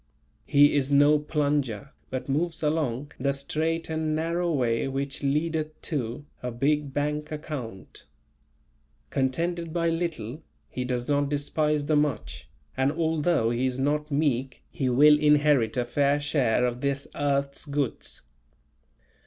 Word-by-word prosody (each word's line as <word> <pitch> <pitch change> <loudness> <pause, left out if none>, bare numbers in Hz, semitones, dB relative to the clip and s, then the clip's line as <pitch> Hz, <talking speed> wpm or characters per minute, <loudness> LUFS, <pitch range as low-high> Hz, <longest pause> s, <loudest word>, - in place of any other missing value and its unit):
He 145 +1 +5
is 140 -1 +1
no 145 +1 +5
"Plunger," 145 -5 -1 0.2
but 130 0 -4
moves 160 +4 -1
along 145 -3 -1
the 140 +2 +1
"straight 160 +4 -2
and 160 -1 -1
narrow 170 +2 0
way 125 -5 +1
which 135 +1 -3
leadeth 155 +2 -1
to" 140 -2 -3 0.2
a 125 - -3
big 140 +4 0
bank 150 +2 -2
account. 140 - -7 1.0
Contented 165 +6 -1
by 170 0 +1
little, 165 -6 -3 0.3
he 125 - -4
does 125 -1 -2
not 145 -1 +1
despise 150 +1 0
the 155 +1 +2
much, 145 -6 -1 0.3
and 130 +1 +2
although 160 -6 +1
he 120 +2 +1
is 130 -1 -2
not 150 +3 0
meek, 135 -4 -1
he 130 - -1
will 150 +4 +6
inherit 145 -6 +3
a 125 - +1
fair 140 +4 +2
share 140 -5 +1
of 125 0 -2
this 140 0 -1
earth's 140 0 -1
goods. 140 -4 -3
145 Hz, 135 wpm, -26 LUFS, 130-150 Hz, 1.0 s, will